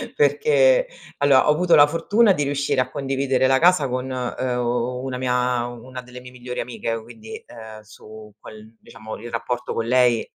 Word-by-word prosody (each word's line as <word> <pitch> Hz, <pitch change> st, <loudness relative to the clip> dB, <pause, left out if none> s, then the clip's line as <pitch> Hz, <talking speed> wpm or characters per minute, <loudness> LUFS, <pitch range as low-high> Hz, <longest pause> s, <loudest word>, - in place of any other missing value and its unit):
perché -, -, +3 dB, 0.3 s
allora 140 Hz, 0 st, +4 dB
ho -, -, +7 dB
avuto 175 Hz, +3 st, +3 dB
la 145 Hz, -, +8 dB
fortuna 195 Hz, +8 st, +2 dB
di 145 Hz, -5 st, 0 dB
riuscire 140 Hz, -1 st, -1 dB
a 130 Hz, 0 st, 0 dB
condividere 135 Hz, -1 st, -1 dB
la 135 Hz, 0 st, +3 dB
casa 170 Hz, -6 st, +3 dB
con, 130 Hz, +1 st, -3 dB
uhm, 125 Hz, 0 st, -2 dB
una 130 Hz, -1 st, -4 dB
mia 125 Hz, -1 st, 0 dB
u 120 Hz, -1 st, -10 dB
una 130 Hz, 0 st, -8 dB
delle 125 Hz, 0 st, -12 dB
mie 125 Hz, 0 st, -12 dB
migliori 125 Hz, 0 st, -6 dB
amiche, 115 Hz, -1 st, -4 dB
quindi, 110 Hz, -1 st, -11 dB
ehm, 110 Hz, -2 st, -12 dB
su 110 Hz, 0 st, -14 dB
quel 110 Hz, +1 st, -13 dB
diciamo 110 Hz, -1 st, -10 dB
il 120 Hz, +2 st, -9 dB
rapporto 120 Hz, +1 st, -4 dB
con 115 Hz, -, -2 dB
lei 125 Hz, -1 st, +2 dB
125 Hz, 180 wpm, -22 LUFS, 120-140 Hz, 0.3 s, la